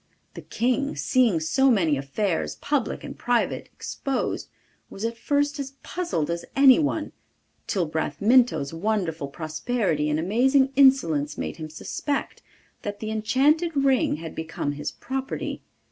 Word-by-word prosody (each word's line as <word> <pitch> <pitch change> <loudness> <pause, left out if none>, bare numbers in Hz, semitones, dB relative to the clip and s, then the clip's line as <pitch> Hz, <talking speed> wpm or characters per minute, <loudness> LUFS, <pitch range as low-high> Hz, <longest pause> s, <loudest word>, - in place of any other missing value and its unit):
The - - -8
King, 260 +4 -1
seeing 240 - +2
so 265 - +3
many 175 - +3
affairs, 160 +7 -2
public 285 -5 -2
and - - -7
private, 240 -1 0
exposed, 275 -1 -3 0.4
was 200 - -5
at 230 0 -2
first 290 +4 0
as 275 -1 -5
puzzled 340 - -2
as 170 0 -3
anyone, 285 +3 +4 0.6
till 185 -4 0
Bramintho's 160 - +2
wonderful 165 -5 -1
prosperity 155 - -1
and 150 +1 +1
amazing 260 - +3
insolence 255 - +4
made 80 -2 -4
him 155 -1 -6
suspect 280 - -4 0.4
that 205 0 -5
the 215 0 -4
enchanted 280 +10 +2
ring 270 - +3
had 160 +1 -7
become 160 -2 -3
his 145 +1 -4
property. 265 +1 -4
220 Hz, 130 wpm, -25 LUFS, 160-270 Hz, 0.6 s, anyone